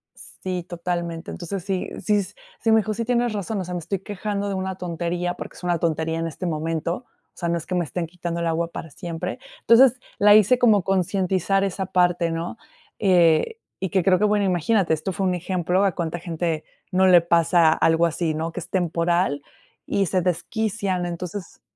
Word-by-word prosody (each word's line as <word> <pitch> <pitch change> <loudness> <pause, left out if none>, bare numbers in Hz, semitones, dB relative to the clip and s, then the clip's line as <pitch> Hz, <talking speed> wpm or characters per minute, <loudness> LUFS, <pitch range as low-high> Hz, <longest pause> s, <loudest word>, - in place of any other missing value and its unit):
Sí, 185 -2 -6
totalmente. 170 -1 -4
Entonces 180 +1 -5
sí 190 -1 -2
sí 205 +2 +2
sí, 220 +4 -4
me 220 - +6
dijo 215 0 0
sí, 230 +2 -3
tienes 240 -1 +1
razón, 205 +1 -3
o - - -3
sea, 180 - -6
me 175 - -2
estoy 190 +4 -3
quejando 205 +1 -3
de - - -2
una 190 0 -3
tontería, 175 0 -2
porque - - -8
es - - -14
una 175 -1 0
tontería 160 0 -1
en 165 - -1
este 165 +3 -6
momento, 165 +1 -1
o - - -41
sea, 170 -2 -2
no 170 - +1
es 165 - -7
que 180 - -3
me 175 - +1
estén 170 +3 -3
quitando 170 0 -4
el 170 - 0
agua 165 +1 0
para 165 - -7
siempre. 165 +2 -5 0.2
Entonces, 240 +1 +6 0.3
la 205 +1 +7
hice 215 +4 +5
como 215 -6 +4
concientizar 190 0 +1
esa 190 -1 -2
parte, 175 -2 +2
¿no?, 165 +6 -4 0.4
eh, 180 - +3 0.2
y 190 - -2
que 190 - +2
creo 185 +1 +4
que 200 - -1
bueno, 210 -1 +3
imagínate 185 0 +2
esto 160 +5 -2
fue 190 +1 -2
un 180 - +1
ejemplo 180 +1 0
a 195 -3 +2
cuánta 170 0 -3
gente 165 -2 -2 0.3
no 190 0 +3
le 180 -2 +7
pasa 170 -1 +4
algo 165 +1 +3
así, 165 -1 -1
¿no?, 160 +2 -3
que 170 - -5
es - - -10
temporal 170 -3 0 0.4
y 200 - +1
se 185 +1 0
desquician. 190 +1 -1
Entonces 175 +2 -6
180 Hz, 200 wpm, -23 LUFS, 170-195 Hz, 0.4 s, la